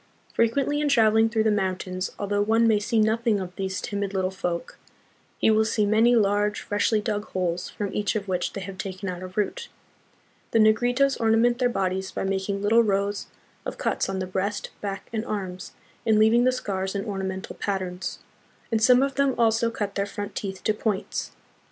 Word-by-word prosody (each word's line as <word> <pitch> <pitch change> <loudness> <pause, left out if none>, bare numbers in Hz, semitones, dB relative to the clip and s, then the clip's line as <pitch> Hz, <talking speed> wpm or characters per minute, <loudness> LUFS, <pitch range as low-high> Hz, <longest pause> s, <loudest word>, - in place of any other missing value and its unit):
Frequently 275 +6 +1
in 295 - +1
travel 220 -5 +4
ing 225 0 +4
through 220 -1 +1
the 220 - +3
mountains, 185 -2 -1
although 205 0 0
one 225 +2 +3
may 215 -2 +4
see 220 +2 0
nothing 220 0 +2
of 185 -1 -6
these 190 -1 -3
timid 200 -1 -3
little 185 0 0
folk, 180 -2 -4 0.6
he - - +3
will 220 0 +4
see 220 -1 +1
many 225 +4 +4
large, 205 -1 +2
freshly 205 +1 +1
dug 210 0 -2
holes 180 -1 -2
from 200 -2 -4
each 210 +1 -1
of 205 -2 -2
which 180 -2 -1
they 195 - -5
have 190 0 -8
taken 190 0 -5
out 180 0 -5
a 185 - -5
root. 210 - -3 0.8
The - - +4
Negritos 245 +6 +3
ornament 230 +2 +3
their 250 -1 +3
bodies 190 -3 -1
by - - -3
making 195 +1 -2
little 225 +3 +5
rows 200 -1 0 0.4
of - - -5
cuts - - -1
on 195 - -2
the 185 - -2
breast, 190 +3 -3
back, 195 -1 -5
and 220 -1 -1
arms, 190 -4 -5 0.3
and 220 -1 +3
leaving 225 +3 +5
the 255 - +5
scars 195 -5 -3
in 200 - -2
ornamental 190 -2 -4
patterns; 185 -3 -3 0.5
and 225 -1 +1
some 250 +2 +6
of 275 0 0
them 280 -1 +1
also 230 0 +3
cut 205 -3 -3
their 200 0 -1
front 205 0 -6
teeth 190 -2 -5
to 215 - +2
points. 210 -2 -2
205 Hz, 195 wpm, -25 LUFS, 190-225 Hz, 0.8 s, some